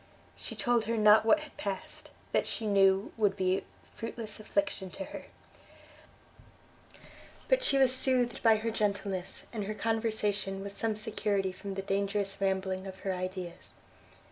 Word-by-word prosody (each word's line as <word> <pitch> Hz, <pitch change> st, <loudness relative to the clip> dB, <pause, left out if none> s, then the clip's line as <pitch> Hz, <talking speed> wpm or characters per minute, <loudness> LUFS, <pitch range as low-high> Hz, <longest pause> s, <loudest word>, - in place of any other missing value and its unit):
She -, -, -6 dB
told 240 Hz, -3 st, +2 dB
her 230 Hz, +1 st, 0 dB
not 215 Hz, +1 st, +6 dB
what 310 Hz, +7 st, +5 dB
had 305 Hz, -2 st, -10 dB
passed; 195 Hz, -2 st, -5 dB, 0.2 s
that, -, -, +1 dB
she 225 Hz, -, -3 dB
knew, 195 Hz, -1 st, +3 dB
would 205 Hz, -3 st, +2 dB
be 185 Hz, -1 st, +1 dB, 0.3 s
fruitless 225 Hz, -2 st, -5 dB
affliction 200 Hz, -2 st, -1 dB
to 190 Hz, -, -6 dB
her: -, -, -8 dB, 2.2 s
but -, -, +4 dB
she 275 Hz, -, +4 dB
was 260 Hz, -1 st, +4 dB
soothed 255 Hz, -2 st, +1 dB
by 225 Hz, -2 st, +6 dB
her 225 Hz, +1 st, -1 dB
gentleness, 200 Hz, -3 st, -1 dB
and 210 Hz, -3 st, -3 dB
her 215 Hz, +1 st, -3 dB
conversation 210 Hz, -4 st, -1 dB
was 200 Hz, 0 st, -5 dB
some 220 Hz, +1 st, -1 dB
security 210 Hz, -2 st, -1 dB
from 195 Hz, +1 st, -7 dB
the 195 Hz, -, -3 dB
dangerous 200 Hz, 0 st, -1 dB
rambling 190 Hz, 0 st, 0 dB
of 190 Hz, 0 st, -9 dB
her 195 Hz, -, -1 dB
ideas. 185 Hz, -1 st, -6 dB
205 Hz, 150 wpm, -31 LUFS, 195-225 Hz, 2.2 s, not